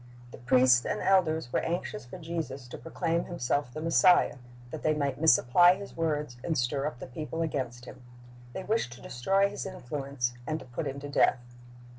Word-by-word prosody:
The - - -11
priests 125 0 +4
and - - -2
elders 160 -8 +2
were - - +3
anxious 165 -9 -4
for 125 - -9
Jesus 160 -6 -5
to - - -7
proclaim 165 0 -1
Flimself 145 -5 -2
the 155 +5 -6
Messiah, 165 +1 +4 0.3
that 160 - -6
they 155 0 +1
might 140 -1 -2
misapply 160 +4 +6
His 200 +1 -9
words 150 -6 -2
and 160 - -1
stir 135 +3 0
up 150 - -6
the - - -8
people 155 +5 -4
against 125 -6 -4
Him. 130 - -12 0.5
They 190 - -5
wished 210 - -1
to 120 - -14
destroy 195 +11 +1
His 205 - -6
influence 140 -7 -4
and 155 - -1
to - - -10
put 125 +5 -4
Him 140 +1 -5
to 145 - -6
death. 125 -3 +2
150 Hz, 190 wpm, -29 LUFS, 125-165 Hz, 0.5 s, misapply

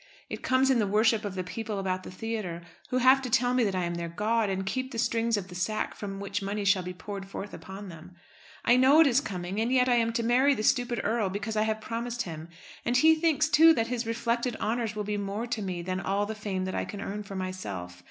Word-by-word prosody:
It - - -5
comes 260 +1 +3
in 255 - +3
the 210 - +1
worship 215 +2 +3
of 200 -2 -4
the 185 - -2
people 215 +3 -5
about 185 -1 -1
the - - -9
theatre, 185 -4 -4 0.3
who 255 - 0
have 260 +2 +5
to 255 - -4
tell 245 +2 +2
me 250 -1 +3
that 200 -3 0
I 185 - 0
am 170 0 -2
their 170 0 -4
god, 215 +5 0
and 190 0 -2
keep 260 +6 -2
the 235 - -6
strings 230 -1 +1
of 190 -2 -4
the 185 - -11
sack 185 +5 -2
from 195 -1 -6
which 200 +1 -3
money 200 +1 -3
shall 195 -1 +4
be 180 0 -5
poured 195 +1 -7
forth 195 +1 -7
upon 195 +1 -8
them. 175 +1 -12 0.5
I 245 - +5
know 265 +4 +6
it - - +7
is 270 -1 +3
coming, 185 0 -4
and 235 +2 0
yet 255 -1 +4
I 245 -1 +4
am 230 -1 +2
to 230 - 0
marry 260 +4 +4
the 215 - -3
stupid 245 0 +1
earl 220 -2 0
because 205 +3 -4
I 215 - +2
have 220 0 -2
promised 235 +1 -3
him. 160 -1 -8 0.3
And 240 +1 +2
he 320 +5 +6
thinks, 315 -1 +2
too, 320 +1 +7
that 230 -2 0
his 245 -2 -2
reflected 235 +1 -1
honours 225 -1 -2
will 210 - -2
be 205 0 -2
more 205 +3 -3
to 235 -2 -3
me 180 -3 -4
than 185 +1 -2
all 195 +1 0
the 220 - -4
fame 200 -3 -3
that 185 - -4
I - - -1
can 205 - -7
earn 205 +2 -4
for 200 -1 -8
myself. 100 - -5
215 Hz, 260 wpm, -28 LUFS, 190-240 Hz, 0.5 s, it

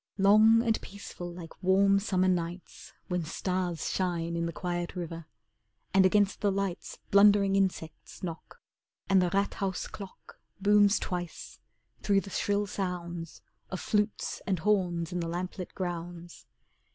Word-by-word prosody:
Long 215 +3 +6
and 225 -2 +1
peaceful 185 -3 -8
like 170 -1 -11
warm 195 +1 +4
Summer 185 -2 +1
nights 175 0 -3 0.2
When 180 -1 -1
stars 175 0 -2
shine 170 -2 -1
in 170 0 -1
the - - -3
quiet 175 0 -3
river. 165 -2 -6 0.7
And 190 0 +6
against 205 +1 +2
the 205 -2 +2
lights 195 -2 -3
Blundering 200 -1 +6
insects 185 -5 -2
knock, 170 - -7 0.5
And 195 -1 +5
the 180 - +2
'Rathaus' 195 0 -1
clock 195 -2 -11 0.2
Booms 205 +1 +5
twice, 175 -2 -5 0.4
through 200 -1 +3
the 195 - -10
shrill 205 +2 0
sounds 175 -4 -5 0.3
Of 185 - -4
flutes 210 0 -1
and 190 -2 +1
horns 175 -3 0
in 180 - -2
the 170 - -2
lamplit 180 +2 -5
grounds. 175 -1 -6
185 Hz, 140 wpm, -29 LUFS, 175-200 Hz, 0.7 s, Long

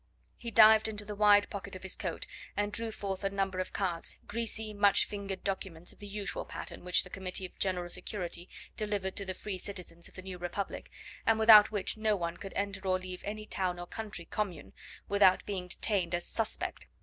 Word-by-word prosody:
He 235 - -6
dived 220 -1 +7
into 210 -1 -3
the 210 - -5
wide 205 0 +6
pocket 200 -1 -5
of 185 - -9
his 190 - -2
coat - - -3 0.3
and 205 0 +1
drew 230 0 0
forth 195 -2 -4
a 195 - +2
number 195 -1 -1
of 185 - -2
cards, 175 -4 -2
greasy, 220 -1 -1
much 200 -1 +4
fingered 200 -2 -5
documents 190 -3 -4
of - - -23
the 205 - -8
usual 200 0 -3
pattern - - -7
which 180 0 +3
the 180 - -11
Committee 190 -1 -3
of 180 - -12
General 180 -2 0
Security 175 -1 -3 0.3
delivered 205 -3 -2
to 200 - 0
the 185 -1 -4
free 195 -2 -5
citizens 180 -3 -7
of - - -23
the 185 - -8
new 185 -1 -7
republic, 175 +3 -4 0.3
and 225 - +4
without 220 -2 +9
which 205 0 -1
no 215 -1 +2
one 170 -3 -3
could 195 - -8
enter 200 0 -2
or 185 0 +3
leave 185 -1 -7
any 215 +1 -5
town 185 -4 -1
or 175 - -6
country 210 -3 -6
commune 205 -4 -4 0.3
without 200 -2 +5
being 190 -3 -3
detained 180 -2 +1
as 175 - -1
"suspect." 225 -2 -2
195 Hz, 205 wpm, -32 LUFS, 185-210 Hz, 0.3 s, without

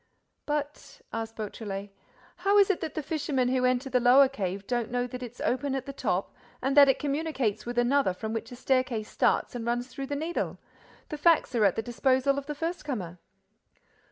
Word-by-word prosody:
"But," 295 0 -4
asked 225 0 -4
Beautrelet, 205 -2 -5 0.5
"how 400 +1 +3
is 400 0 +6
it 375 - -3
that 320 - -4
the 310 - -2
fishermen 275 -4 0
who 255 0 +1
enter 255 +1 +1
the 255 -1 +2
lower 255 +3 +7
cave 195 -6 -4
don't 240 0 -1
know 245 0 0
that 250 +1 -7
it's 245 0 -8
open 270 +2 0
at 265 -1 -3
the 275 - -6
top 200 -8 -1 0.3
and 270 +2 -1
that 285 -1 +8
it 270 - +4
communicates 275 -8 -2
with 240 0 -4
another 240 -5 +3
from 220 +3 -4
which 225 - -4
a - - -7
staircase 255 -4 0
starts - - +1
and 240 -2 -4
runs 240 +2 -1
through 270 +1 -6
the 285 - -2
Needle? 320 +4 -2 0.5
The 300 - -5
facts 330 -3 +4
are 225 -3 +3
at 195 - +3
the 225 - -2
disposal 260 +4 +1
of 280 - -11
the 295 - -4
first 330 +3 -3
comer." 185 - -5
255 Hz, 205 wpm, -28 LUFS, 225-285 Hz, 0.5 s, that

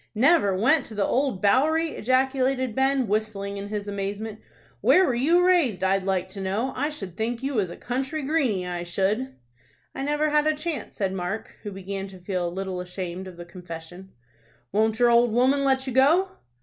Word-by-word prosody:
"Never 220 - +4
went 260 +8 +3
to 220 - -9
the 205 - +1
Old 260 -8 0
Bowery!" 310 +9 +3
ejaculated 260 0 +1
Ben, 265 0 +1
whistling 200 -1 -2
in 200 0 -5
his 205 -1 -4
amazement. 205 +2 -4 0.4
"Where 375 - +5
were 260 - +1
you 330 +9 +3
raised, 280 - +3
I'd 190 0 +1
like 190 -1 0
to 195 +1 -7
know? 205 +7 -1
I 290 +4 0
should 195 - -7
think 230 +4 -3
you 275 +1 -1
was 205 -7 0
a - - -9
country 270 +5 -3
greeny, 265 - 0
I 175 -1 -4
should." 200 +9 -1 0.6
"I - - -5
never 295 +2 0
had 300 0 +3
a 310 - +2
chance," 310 0 -5
said 195 -2 -1
Mark, 190 +3 -4
who 205 - -6
began 195 0 -5
to 190 -1 -12
feel 180 -1 -2
a - - -2
little 185 0 -4
ashamed 180 0 -6
of 180 -2 -11
the 175 - -8
confession. 175 +1 -10 0.6
"Won't 220 +1 +2
your 240 0 +4
old 235 -1 +4
woman 260 +4 +3
let 265 -1 +2
you 260 - -4
go?" 315 +9 +4
220 Hz, 195 wpm, -25 LUFS, 190-270 Hz, 0.6 s, Where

